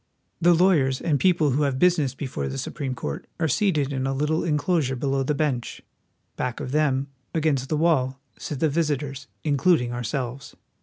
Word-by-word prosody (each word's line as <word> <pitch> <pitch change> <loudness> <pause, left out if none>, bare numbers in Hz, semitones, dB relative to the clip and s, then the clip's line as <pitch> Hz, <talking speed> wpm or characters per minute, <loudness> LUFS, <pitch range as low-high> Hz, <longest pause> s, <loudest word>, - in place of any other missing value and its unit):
34 175 +1 +6
WASHINGTON. - - +3
The 175 - +4
lawyers 135 -8 +3
and 150 -5 +1
people 170 -4 +3
who 140 +4 +1
have 140 -3 +1
business 155 -5 +2
before 125 - -4
the 65 0 -4
Supreme 130 - -4
Court 70 - -5
are 160 - +2
seated 150 -4 +1
in 130 0 -1
a 135 - 0
little 150 +3 0
inclosure 150 -3 +1
below 135 +1 0
the 145 +3 0
bench. 140 -6 -2 0.5
Back 125 -2 -3
of 130 - -5
them, 140 -2 +2 0.3
against 145 -5 +1
the 155 - +1
wall, 135 -5 +2 0.2
sit 145 -3 -6
the 160 - +4
visitors, 145 -3 -2 0.2
including 140 -4 +2
ourselves. 120 +2 -4
140 Hz, 185 wpm, -24 LUFS, 130-155 Hz, 0.5 s, 34